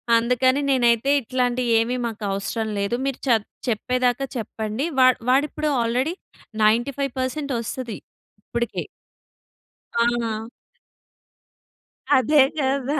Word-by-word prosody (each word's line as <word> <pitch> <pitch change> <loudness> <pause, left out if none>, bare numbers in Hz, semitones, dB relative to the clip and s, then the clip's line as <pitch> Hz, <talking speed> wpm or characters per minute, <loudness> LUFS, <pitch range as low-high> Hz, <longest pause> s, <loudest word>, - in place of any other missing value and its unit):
అందుకని 250 +4 +2
నేనైతే 240 -1 +3
ఇట్లాంటియి 250 0 0
ఏమి 235 +2 0
మాకు 225 -2 -5
అవసరం 200 +3 -2
లేదు. 200 +4 0
మీరు 275 -2 -2
చప్ 225 -4 +3 0.2
చెప్పేదాకా 250 +3 0
చెప్పండి. 220 +4 -3
వా 255 - +7 0.2
వాడిప్పుడు 300 +3 +1
ఆల్రెడీ 250 +7 0 0.5
95% 260 +5 0
వస్తది 235 -1 -5 0.5
ఇప్పటికీ. 235 +2 -3 1.1
ఆ! 235 -1 0 1.7
అదే 275 +4 +4 0.2
కదా! 275 +1 0
245 Hz, 90 wpm, -23 LUFS, 230-265 Hz, 1.7 s, వా